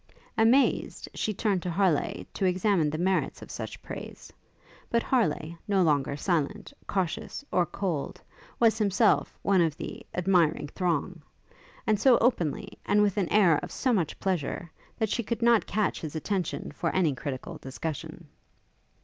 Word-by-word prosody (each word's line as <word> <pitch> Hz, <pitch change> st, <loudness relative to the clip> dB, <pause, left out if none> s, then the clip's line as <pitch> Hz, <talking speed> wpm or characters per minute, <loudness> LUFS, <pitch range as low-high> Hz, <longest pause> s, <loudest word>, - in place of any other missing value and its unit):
Amazed, 235 Hz, +5 st, +3 dB
she 215 Hz, -, -1 dB
turned 200 Hz, -2 st, 0 dB
to 180 Hz, -, -3 dB
Harleigh, 175 Hz, -3 st, +1 dB
to -, -, -3 dB
examine 185 Hz, -3 st, +2 dB
the 155 Hz, -, -3 dB
merits 185 Hz, +3 st, 0 dB
of -, -, -10 dB
such -, -, -6 dB
praise; -, -, -9 dB, 0.6 s
but 235 Hz, 0 st, +1 dB
Harleigh, 170 Hz, -, 0 dB
no 195 Hz, -2 st, +3 dB
longer 145 Hz, -3 st, +1 dB
silent, 175 Hz, -, -1 dB
cautious, 190 Hz, -, -2 dB
or 175 Hz, -2 st, +2 dB
cold, 175 Hz, -7 st, -3 dB, 0.4 s
was 225 Hz, -1 st, +4 dB
himself 210 Hz, +1 st, +2 dB
one 195 Hz, -2 st, +4 dB
of 160 Hz, -3 st, +1 dB
the -, -, -7 dB
'admiring 170 Hz, -5 st, +2 dB
throng,' 175 Hz, -1 st, -1 dB, 0.6 s
and 215 Hz, -2 st, +2 dB
so 250 Hz, +1 st, +6 dB
openly, 200 Hz, -, 0 dB
and 210 Hz, 0 st, +3 dB
with 205 Hz, -2 st, +1 dB
an 190 Hz, -4 st, +1 dB
air 180 Hz, -8 st, +5 dB
of -, -, -8 dB
so 255 Hz, -2 st, 0 dB
much 175 Hz, -8 st, -1 dB
pleasure, 175 Hz, -2 st, -2 dB, 0.3 s
that 220 Hz, -, +1 dB
she 235 Hz, -, 0 dB
could 235 Hz, +1 st, -3 dB
not 235 Hz, -2 st, +4 dB
catch 215 Hz, -1 st, 0 dB
his 155 Hz, -1 st, -6 dB
attention 180 Hz, +2 st, -2 dB
for 170 Hz, -, -2 dB
any 170 Hz, -6 st, +3 dB
critical 130 Hz, -1 st, -6 dB
discussion. 155 Hz, +4 st, -6 dB
185 Hz, 155 wpm, -28 LUFS, 160-210 Hz, 0.6 s, so